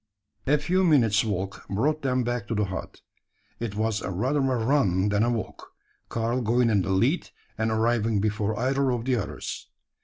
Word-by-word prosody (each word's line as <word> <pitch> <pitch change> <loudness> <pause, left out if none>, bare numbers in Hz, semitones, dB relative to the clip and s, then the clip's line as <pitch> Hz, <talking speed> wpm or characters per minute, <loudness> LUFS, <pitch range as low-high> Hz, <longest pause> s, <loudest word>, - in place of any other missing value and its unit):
A 150 +2 +4
few 185 +5 +1
minutes' 120 - +4
walk 95 -3 -4
brought 150 +10 0
them 130 -2 +1
back 120 -3 -2
to 115 - -2
the 105 0 +1
hut. 95 0 -7 0.6
It 115 -3 -4
was 110 0 0
rather 125 +11 -1
a 135 -2 +1
run 110 -6 +2
than 100 0 +1
a 120 - +3
walk 115 -3 -5 0.4
Karl 115 +2 -1
going 120 +1 +2
in 100 -3 +3
the 95 - -3
lead, 120 - +1 0.3
and 110 +1 0
arriving 110 -1 +1
before 105 0 -1
either 135 +2 +1
of 120 -2 -1
the 130 -1 +2
others. 105 - -5
115 Hz, 180 wpm, -26 LUFS, 105-130 Hz, 0.6 s, A